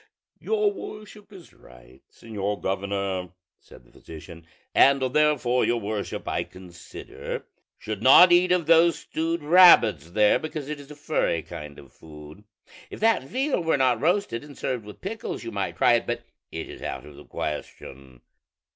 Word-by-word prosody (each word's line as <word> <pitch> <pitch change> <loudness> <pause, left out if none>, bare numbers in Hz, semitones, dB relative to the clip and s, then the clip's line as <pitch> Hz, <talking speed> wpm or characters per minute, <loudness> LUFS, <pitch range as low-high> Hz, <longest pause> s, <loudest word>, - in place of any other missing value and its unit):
"Your 425 -2 0
worship 210 - -11
is 185 -4 -15
right, - - -19
señor 105 -2 -5
governor," 95 -2 -3 0.3
said - - -18
the - - -24
physician; 80 +1 -13 0.3
"and 140 0 +5
therefore 130 -2 +1
your 120 - +1
worship, 105 -1 -5
I - - -1
consider, 90 -1 -9 0.3
should 110 -2 -6
not 155 +9 +8
eat 180 +1 +4
of 180 -2 +2
those 165 +1 +4
stewed 165 0 -3
rabbits 145 - +6
there, 105 +3 +3
because 155 -2 -6
it 150 - -6
is 140 - -13
a 150 - -10
furry 145 - -1
kind 75 -4 -10
of - - -15
food: 75 +5 -14 0.4
if - - -10
that 225 -5 +2
veal 260 - -2
were 160 -3 +1
not 130 -3 +1
roasted 170 - 0
and 145 -2 -13
served 125 -4 -4
with 105 - -12
pickles, 215 - -6
you 115 - -6
might 100 -2 -4
try - - +4
it; - - 0
but - - -3 0.3
it - - -6
is - - -11
out - - -6
of 75 - -13
the - - -14
question." 65 -4 -7
120 Hz, 165 wpm, -24 LUFS, -, 0.4 s, not